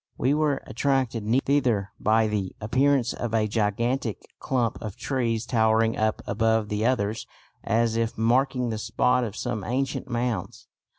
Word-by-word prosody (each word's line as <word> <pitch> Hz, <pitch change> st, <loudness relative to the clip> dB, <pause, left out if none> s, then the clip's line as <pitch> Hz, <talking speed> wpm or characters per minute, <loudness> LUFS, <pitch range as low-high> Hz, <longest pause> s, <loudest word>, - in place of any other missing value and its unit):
We 135 Hz, -, +2 dB
were 150 Hz, -2 st, +1 dB
attracted 130 Hz, -3 st, 0 dB, 0.2 s
thither 125 Hz, -8 st, +1 dB
by 110 Hz, +1 st, +3 dB
the 100 Hz, -3 st, -2 dB
appearance 130 Hz, +3 st, +2 dB
of 115 Hz, -2 st, -3 dB
a 110 Hz, -1 st, +2 dB
gigantic 115 Hz, +3 st, 0 dB, 0.2 s
clump 125 Hz, -4 st, -1 dB
of 105 Hz, -2 st, -6 dB
trees 115 Hz, -4 st, -1 dB
towering 110 Hz, -2 st, +2 dB
up 110 Hz, 0 st, 0 dB
above 110 Hz, -1 st, +1 dB
the 105 Hz, +1 st, -1 dB
others 110 Hz, -4 st, -1 dB, 0.4 s
as 115 Hz, 0 st, +1 dB
if 115 Hz, 0 st, -1 dB
marking 125 Hz, +2 st, +2 dB
the 110 Hz, -, -3 dB
spot 125 Hz, +3 st, +1 dB
of 110 Hz, -3 st, -4 dB
some 120 Hz, -5 st, -3 dB
ancient 130 Hz, +4 st, -2 dB
mounds. 120 Hz, -5 st, -3 dB
115 Hz, 145 wpm, -25 LUFS, 110-125 Hz, 0.4 s, by